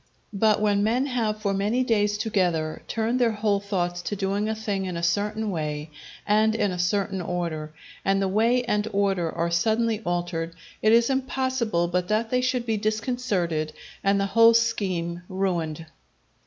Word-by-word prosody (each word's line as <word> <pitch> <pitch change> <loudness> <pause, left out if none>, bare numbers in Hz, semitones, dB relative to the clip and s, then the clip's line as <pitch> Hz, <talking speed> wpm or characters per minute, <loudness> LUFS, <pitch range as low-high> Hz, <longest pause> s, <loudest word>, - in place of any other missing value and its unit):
But 210 +1 +3
when 205 -1 +2
men 240 +5 +2
have 225 -5 -1
for 200 -1 +1
many 210 +6 +1
days 210 -3 +1
together 175 -8 0
turned 230 +3 0
their 235 -3 +3
whole 210 -1 +1
thoughts 175 -3 -2
to 205 - -3
doing 200 +2 -1
a 220 - -1
thing 205 -3 -2
in 180 -2 -4
a 170 - -4
certain 210 +4 0
way 150 -2 -4 0.3
and 215 +1 +3
in 205 -3 +1
a 180 - -4
certain 190 +1 0
order, 165 -3 -3 0.3
and 195 0 +2
the 195 - +1
way 230 +6 +2
and 210 -3 0
order 195 -4 +1
are 170 0 -1
suddenly 220 +5 +1
altered, 175 -2 -2 0.3
it 215 - +4
is 235 +3 +4
impossible 260 -8 0
but 180 +1 -1
that 220 +2 0
they 250 0 +2
should 250 -1 0
be 225 -2 0
disconcerted 210 -8 -1 0.3
and 200 0 +3
the 195 - +1
whole 230 +3 +6
scheme 185 -7 0
ruined. 170 -5 -2
205 Hz, 170 wpm, -25 LUFS, 175-225 Hz, 0.3 s, whole